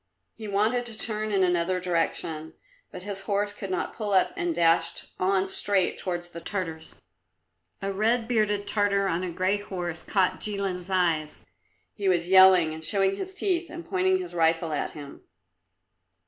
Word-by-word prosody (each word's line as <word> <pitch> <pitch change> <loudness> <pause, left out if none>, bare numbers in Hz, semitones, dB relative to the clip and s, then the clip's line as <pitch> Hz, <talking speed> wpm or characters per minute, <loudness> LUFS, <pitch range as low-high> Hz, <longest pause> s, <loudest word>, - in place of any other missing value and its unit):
He 220 -1 -9
wanted 220 +5 +1
to 225 -2 -4
turn 215 -1 +2
in 195 -2 +3
another 180 0 +1
direction, 165 -3 -2 0.4
but - - -8
his 200 -1 -5
horse 205 +1 -1
could 200 -1 -7
not 185 - -2
pull 210 -3 -3
up 185 - +3
and 170 -2 -2
dashed 165 0 +2
on 190 +1 +2
straight 195 -1 0
towards 175 -1 -4
the 170 -1 -9
Tartars. 165 -4 -5 0.8
A 195 0 -2
red 225 +3 +1
bearded 210 -3 0
Tartar 200 -1 +1
on 170 -1 -1
a 185 - -3
grey 185 +4 0
horse 175 -4 -5
caught 190 -3 0
Jilin's 195 -3 -3
eyes. 165 -5 0 0.5
He 200 -2 -1
was 175 -1 +1
yelling 185 -4 +7
and 160 0 -7
showing 195 +2 +2
his 375 - -5
teeth 360 -4 -1
and 340 +1 -8
pointing 375 0 +1
his 365 -1 -7
rifle 165 -1 +1
at 150 - -2
him. 145 -2 -10
190 Hz, 165 wpm, -26 LUFS, 175-205 Hz, 0.8 s, yelling